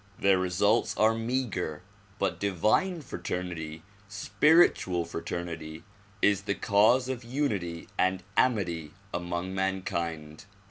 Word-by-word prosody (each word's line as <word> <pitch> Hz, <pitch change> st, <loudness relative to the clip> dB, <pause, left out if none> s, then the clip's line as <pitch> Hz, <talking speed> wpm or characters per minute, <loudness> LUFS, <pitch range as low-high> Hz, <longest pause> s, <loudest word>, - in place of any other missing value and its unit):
Their 100 Hz, -1 st, +3 dB
results 100 Hz, +5 st, +1 dB
are 110 Hz, +1 st, +4 dB
meager 115 Hz, -9 st, -2 dB, 0.3 s
but 100 Hz, -2 st, -1 dB
divine 110 Hz, -, +1 dB
fraternity, 85 Hz, -, -5 dB, 0.2 s
spiritual 105 Hz, -, +3 dB
fraternity 85 Hz, -1 st, -5 dB, 0.4 s
is 100 Hz, -2 st, +4 dB
the 100 Hz, 0 st, -2 dB
cause 110 Hz, +6 st, +3 dB
of 130 Hz, -2 st, -4 dB
unity 105 Hz, -, -2 dB
and 95 Hz, 0 st, +2 dB
amity 85 Hz, -11 st, +1 dB, 0.2 s
among 85 Hz, +1 st, -3 dB
mankind. 85 Hz, -4 st, -3 dB
95 Hz, 100 wpm, -28 LUFS, 85-110 Hz, 0.4 s, are